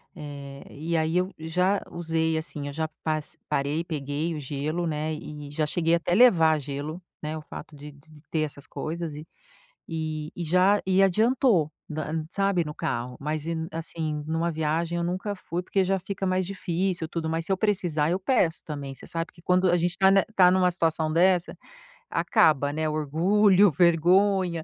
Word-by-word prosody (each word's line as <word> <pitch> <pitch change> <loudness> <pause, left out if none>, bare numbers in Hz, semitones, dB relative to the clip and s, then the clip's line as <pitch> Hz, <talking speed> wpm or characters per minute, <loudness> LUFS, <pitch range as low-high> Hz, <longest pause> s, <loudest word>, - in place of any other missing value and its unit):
eh 140 -3 -8
e 165 +4 -2
aí 160 +2 +1
eu 185 +2 0
já 180 +5 0
usei 160 -1 0
assim, 145 -2 -4
já 160 +2 -1 0.2
pas 155 -1 -2
parei, 150 +2 0
peguei 155 0 -3
o - - -4
gelo, 150 +5 -3
né, 155 0 -2
e 150 -1 -8
já 155 +1 0
cheguei 165 +1 +1
até 175 +1 -1
levar 165 -10 +6
gelo, 145 +4 -5 0.2
né, 155 +1 -4
o 155 - -7
fato 150 - -10
de 145 +1 -10
de 150 +1 -18
ter 160 - 0
essas 145 -2 -5
coisas 165 -1 -5
e 155 +3 -9 0.6
e 155 -1 -3
e 175 - -3
já 185 +5 +3
e 190 +1 +4
adiantou, 215 - +3 0.2
na, 155 0 -4
e, 160 0 -1
sabe, 195 -2 +1
no 150 -1 -6
carro. 120 +1 -3
Mas 150 +1 -3
e 165 0 -2 0.2
assim, 160 -2 -4
numa 165 +2 -1
viagem 160 +2 -1
eu 170 - -1
nunca 185 +4 -2
fui 175 -2 -4
porque 190 +2 +1
já 190 +1 +1
fica 195 +1 -4
mais 185 0 +1
difícil 180 -2 -2
e - - -18
tudo, 160 -1 -3
mas 165 +1 -2
se 195 - 0
eu - - +2
precisar 175 -7 0
eu 185 +2 0
peço 185 -6 +1
também, 140 -3 -6
você - - -13
sabe 165 0 -4
que - - -18
quando 180 +1 +3
a 175 - +4
gente 175 +1 -1
tá 190 0 +5
ne 195 -1 +5
tá 180 -2 +7
numa 185 -1 +3
situação 160 -2 0
dessa, 175 +2 +2 0.5
acaba, 145 -2 +3
né, 155 +1 -1
orgulho, 185 +7 +4
vergonha, 175 +2 +3
165 Hz, 190 wpm, -26 LUFS, 155-180 Hz, 0.6 s, tá